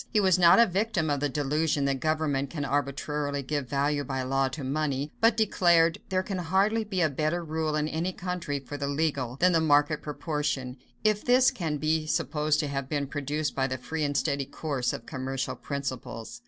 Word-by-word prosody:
He 215 - +3
was 185 -3 +4
not 170 -1 +7
a 235 - +7
victim 190 -5 0
of 145 - 0
the 145 +1 0
delusion 145 +1 0
that 135 -1 0
government 155 -3 0
can 145 -2 -4
arbitrarily 145 +1 -2
give 140 -1 -3
value 145 +2 0
by 130 -1 -3
law 135 +1 +1
to 135 +2 -6
money, 140 +1 -1
but 225 0 +4
declared, 175 -6 +3
"There 185 -1 +1
can 190 -1 -4
hardly 195 +6 +2
be 195 -4 -2
a 160 - +4
better 155 +4 -1
rule 155 -1 -1
in 150 0 0
any 165 +4 -2
country 180 -5 -3
for 140 +1 -7
the 140 -1 -2
legal, 140 -4 -1
than 180 +6 +3
the 165 -2 +3
market 145 0 +3
proportion; 145 -4 -3 0.3
if 215 -1 +2
this 250 +2 +5
can 165 - -3
be 155 +1 0
supposed 150 0 0
to 150 - -2
have 135 -1 -4
been 145 -2 -1
produced 145 +2 -2
by 135 -1 0
the 130 -1 -3
free 155 +5 -4
and 145 -1 0
steady 140 -3 0
course 140 -3 -2
of - - -7
commercial 135 0 -3
principles." 130 - -5
150 Hz, 200 wpm, -28 LUFS, 140-165 Hz, 0.3 s, not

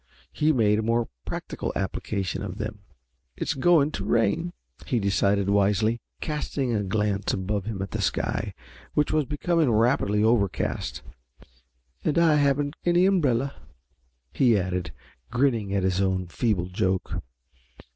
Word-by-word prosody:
He 155 +1 +2
made 110 -6 +3
a - - +1
more 115 +1 0 0.2
practical - - -4
application 95 0 -2
of 95 -1 -5
them. 110 -1 -5 0.6
"It's - - -1
going 155 +1 +4
to - - -4
rain," 160 +9 +1 0.4
he 125 - +1
decided 100 0 +2
wisely, 105 +3 +2 0.2
casting 145 -4 -2
a 105 - +1
glance 105 0 0
above 100 +1 -2
him 105 -3 -3
at 95 - -7
the - - -2
sky, - - -1 0.4
which 150 - +2
was 155 -2 +2
becoming 155 +1 +1
rapidly 110 -2 +2
overcast. 110 -4 0 1.0
"And 150 - 0
I 165 -3 +5
haven't 145 +1 +1
any 175 +1 +4
umbrella," 140 -8 +2 0.8
he 120 -5 +4
added, 90 -1 -2 0.4
grinning 120 -6 +1
at 100 -1 0
his 95 0 +1
own 95 -1 0
feeble 95 0 0
joke. 95 -2 -1
110 Hz, 135 wpm, -26 LUFS, 100-140 Hz, 1.0 s, I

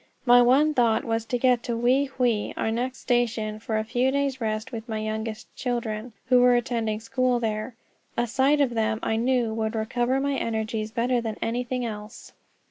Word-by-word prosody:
My 245 0 +7
one 275 +6 +4
thought 235 -4 +2
was 225 0 -1
to 245 - -1
get 250 -1 +3
to 235 -1 -3
Wei 255 +4 +3
Hwei, 245 -5 -1
our 220 - 0
next 250 +3 -3
station, 225 -3 0
for 220 0 -2
a 215 - 0
few 245 +4 +1
days' 275 -1 -1
rest 215 +1 -2
with 230 -1 -7
my 220 - -2
youngest 220 +1 -5
children, 235 -2 -3
who 250 0 +5
were 250 0 +6
attending 230 -3 -1
school 250 +2 0
there. 220 +1 -3 0.4
A 240 - +2
sight 270 +5 +2
of 270 -3 +2
them, 220 -1 0
I 220 - 0
knew, 240 -1 +1
would 220 0 -2
recover 240 +4 0
my 280 +1 0
energies 220 -3 -2
better 240 +2 0
than 220 -2 -4
anything 245 +2 -2
else. 210 -1 -8
235 Hz, 190 wpm, -25 LUFS, 220-250 Hz, 0.4 s, My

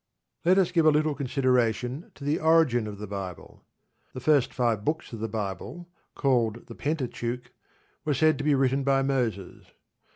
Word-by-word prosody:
Let 185 +3 +4
us 185 -2 +3
give 165 -3 +3
a - - +9
little 155 0 +2
consideration 125 - 0
to 140 - -12
the 145 +2 0
origin 160 -8 +3
of 105 -1 -7
the 105 - -6
Bible. 95 -3 -7 0.5
The - - -6
first 140 0 +3
five 115 -4 0
books 155 -1 -2
of 115 - -6
the 110 - -2
Bible, 110 - -5 0.2
called 120 -5 +1
the - - -10
Pentateuch, 125 -4 -3 0.5
were 150 -2 0
said 155 +1 +3
to - - -2
be 145 -1 +3
written 135 +1 +1
by 135 0 +2
Moses. 120 -8 -2
130 Hz, 170 wpm, -27 LUFS, 115-150 Hz, 0.5 s, a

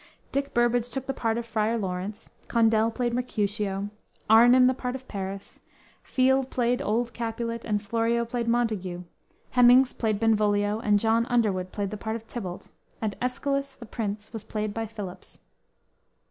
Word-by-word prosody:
Dick 275 0 -1
Burbage 240 0 +2
took 265 +1 -4
the 270 - -2
part 225 -3 -1
of 235 - -3
Friar 225 0 0
Laurence, 190 +1 -4 0.2
Condell 225 -1 +3
played 240 +1 -2
Mercutio, 205 -4 -2 0.4
Arnim 245 +3 +7
the 255 - +4
part 250 0 -4
of 260 0 -9
Paris, 195 -1 -6 0.4
Field 265 0 +2
played 245 -1 +1
old 230 +2 0
Capulet, 230 0 -3
and 210 -2 -1
Florio 230 +2 +1
played 235 0 -3
Montague, 215 -7 0 0.5
Hemmings 250 +1 +6
played 215 -3 -1
Benvolio, 210 -1 +2
and 210 -2 +3
John 225 +2 +2
Underwood 200 -7 +1
played 200 -1 -3
the 215 - -4
part 220 +1 -3
of 225 -1 -7
Tybalt, 190 -6 -7 0.3
and 215 -3 -2
Escalus, 275 +2 -1
the 235 - -11
Prince, 210 -1 -5
was 220 -2 -5
played 215 -1 -3
by 225 0 -3
Phillips. 205 -4 -8
225 Hz, 160 wpm, -27 LUFS, 210-240 Hz, 0.5 s, Arnim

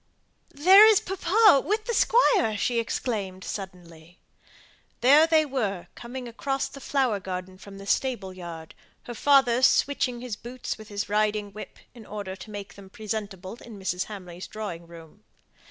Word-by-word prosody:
"There 380 +9 +8
is 435 -3 +6
papa, 385 -3 +4
with 430 +2 -1
the 470 - -2
Squire!" 425 - +3
she 200 +5 0
suddenly - - +4
exclaimed. 185 -7 -5 0.8
There 290 +6 +6
they 320 -1 +4
were 215 -10 -3
coming 245 +1 -8
across 270 +4 -2
the 275 - -12
flower 260 -8 0
garden 185 0 -7
from 195 0 -12
the 195 - -10
stable 200 -4 -1
yard, 170 -3 -9 0.3
her 240 - -7
father 255 -1 +3
switching 260 -2 +2
his 245 -3 -5
boots 240 +4 -6
with 215 - -11
his 205 0 -4
riding 210 0 0
whip, 215 - -10 0.2
in 230 -3 -14
order 200 -2 -6
to 190 +3 -12
make 205 -1 -8
them 195 -1 -14
presentable 205 -1 -6
in 230 -3 -11
Mrs. 185 -2 -2
Hamley's 185 -4 -9
drawing 180 -6 -7
room. 165 -2 -14
215 Hz, 155 wpm, -26 LUFS, 190-265 Hz, 0.8 s, There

